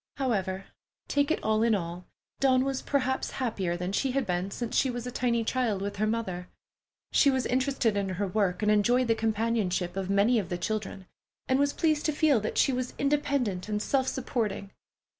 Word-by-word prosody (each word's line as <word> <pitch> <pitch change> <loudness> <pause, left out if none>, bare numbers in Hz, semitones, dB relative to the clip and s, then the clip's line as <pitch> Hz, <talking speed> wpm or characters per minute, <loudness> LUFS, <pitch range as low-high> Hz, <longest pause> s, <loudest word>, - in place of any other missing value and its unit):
However, 195 -8 -1 0.4
take 285 0 +1
it 325 - 0
all 215 0 +2
in 230 -1 +3
all, 175 -1 -5 0.3
Dawn 260 -1 +3
was 270 -1 -2
perhaps 265 -2 0
happier 195 -9 -1
than 180 +1 -3
she 255 +6 0
had 275 -2 0
been 180 0 -1
since 235 +3 -4
she 265 - +3
was 245 -1 -4
a 250 - -4
tiny 235 -2 0
child 230 -4 0
with 200 +1 -4
her 215 +2 +1
mother. 190 -6 -3 0.6
She 285 - +5
was 260 -2 +1
interested 260 -3 +1
in 200 -1 -1
her 190 +2 -2
work, 190 0 0
enjoyed 210 +4 +3
the - - +6
companionship 220 -5 0
of 195 -1 -3
many 205 +4 +3
of 185 -4 -4
the 175 - -2
children, 200 0 -3 0.4
and 260 +1 +2
was 285 0 +3
pleased 310 -1 +1
to 305 - +1
feel 295 -5 +3
that 215 - -4
she 270 - +4
was 250 0 -3
independent 275 -9 0
and 210 0 0
self 265 +4 0
supporting. 220 -7 -2
225 Hz, 195 wpm, -28 LUFS, 195-260 Hz, 0.6 s, the